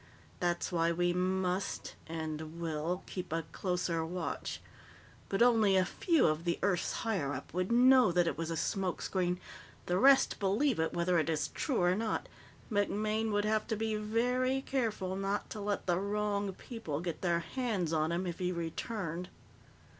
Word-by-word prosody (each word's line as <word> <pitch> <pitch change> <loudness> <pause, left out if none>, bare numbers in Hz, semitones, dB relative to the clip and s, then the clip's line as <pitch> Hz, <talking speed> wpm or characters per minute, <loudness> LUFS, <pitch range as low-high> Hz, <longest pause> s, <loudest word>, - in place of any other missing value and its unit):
That's 175 +1 0
why 165 -1 +2
we 175 +1 +1
must 185 +1 -1
and 160 0 -5
will 165 +2 -2
keep 180 -3 -6
a 165 0 0
closer 180 -3 -1
watch. 170 +1 -4 0.7
But 195 +4 +3
only 220 -5 +5
a 185 - +4
few 330 - +2
of 155 +1 +1
the 170 -1 0
Earth's 185 -3 +1
higher 185 -11 0
up - - -7
would 185 +4 -1
know 250 -3 +6
that 175 0 +3
it 165 - 0
was 165 0 -3
a 165 - -2
smoke 190 +1 -1
screen; 180 -1 0 0.5
the 180 +1 +1
rest 275 +1 +5
believe 210 - +2
it, 160 - +1
whether 175 0 +2
it 160 - 0
is 155 -2 0
true 255 - -1
or 175 0 +4
not. 220 +2 -1 0.4
MacMaine 215 +2 0
would 205 0 +1
have 215 0 +1
to 225 - 0
be 220 +1 -1
very 250 +5 +1
careful 215 -9 -1
not 195 +1 -2
to 215 - -5
let 205 0 -2
the 175 -1 +2
wrong 205 0 -1
people 185 - -5
get 170 -1 -4
their 170 -2 +1
hands 200 -6 -2
on 155 +1 +1
him 175 +2 -1
if 175 0 -4
he 180 -1 0
returned." 170 +1 -4
185 Hz, 175 wpm, -32 LUFS, 170-215 Hz, 0.7 s, know